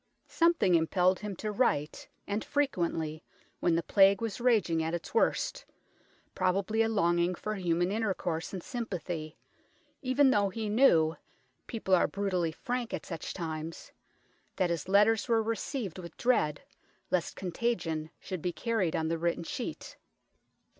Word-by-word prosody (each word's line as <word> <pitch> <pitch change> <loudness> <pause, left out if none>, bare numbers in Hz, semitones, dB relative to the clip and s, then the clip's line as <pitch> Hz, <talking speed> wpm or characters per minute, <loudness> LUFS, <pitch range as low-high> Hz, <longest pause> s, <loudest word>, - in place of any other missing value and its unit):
Something 335 - +3
impelled 180 +3 +3
him 210 -2 -5
to 215 +4 -4
write, 155 - 0 0.2
and 205 +2 -2
frequently, 170 - -1 0.4
when 170 -2 +2
the 165 - 0
Plague 195 +1 +5
was 225 0 -4
raging 215 -10 +3
at 160 +1 -1
its 170 - -7
worst, 460 - +1 0.7
probably 195 +4 +1
a 225 - +2
longing 175 -4 +2
for 215 +4 -4
human 175 -2 0
inter 215 -2 0
course 165 -2 -3
and 185 -3 -6
sympathy, 175 -9 -5 0.6
even 265 0 +4
though 205 -4 +3
he 215 +2 -4
knew 170 - +4 0.5
people 215 -5 -2
are 180 - +5
brutally 185 -4 -1
frank 245 +7 -3
at - - -8
such 165 -3 -5
times 160 -2 -5 0.6
that 180 -2 +1
his 170 +1 -3
letters 210 +3 +4
were 225 -2 +3
received 225 - -3
with 170 -2 -10
dread, 155 - +1 0.5
lest 180 -2 0
con 185 -2 -5
tagion 170 -7 -1
should 185 -3 -6
be 180 - -1
carried 215 -4 -1
on 160 - 0
the 165 0 -1
written 170 0 0
sheet. 250 - -6
185 Hz, 150 wpm, -30 LUFS, 170-225 Hz, 0.7 s, Plague